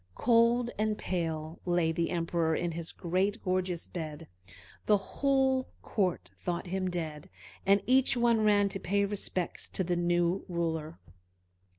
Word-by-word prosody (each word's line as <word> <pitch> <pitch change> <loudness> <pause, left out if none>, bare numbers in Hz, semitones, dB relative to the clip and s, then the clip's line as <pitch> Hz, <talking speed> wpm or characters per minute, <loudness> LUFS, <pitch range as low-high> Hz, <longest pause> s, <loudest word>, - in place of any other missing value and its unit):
Cold 235 +1 +3
and 215 0 +1
pale 160 -2 -3
lay 175 -2 +2
the 165 +1 -1
Emperor 165 -2 0
in 175 - -1
his 165 0 -5
great, 190 +5 -1
gorgeous 185 -2 -1
bed; 160 -2 -6 0.6
the 210 - +6
whole 265 +4 +1 0.2
court 150 - -1
thought 170 - -3
him 185 +1 -2
dead, 160 -4 -5 0.4
and 200 0 +5
each 255 0 +4
one 235 -2 +3
ran 205 -1 +4
to 195 0 -3
pay 200 +2 +1
respect 195 -3 -3
to 190 - +1
the 175 0 0
new 175 +1 +1
ruler. 165 -2 -2
180 Hz, 145 wpm, -30 LUFS, 165-205 Hz, 0.6 s, the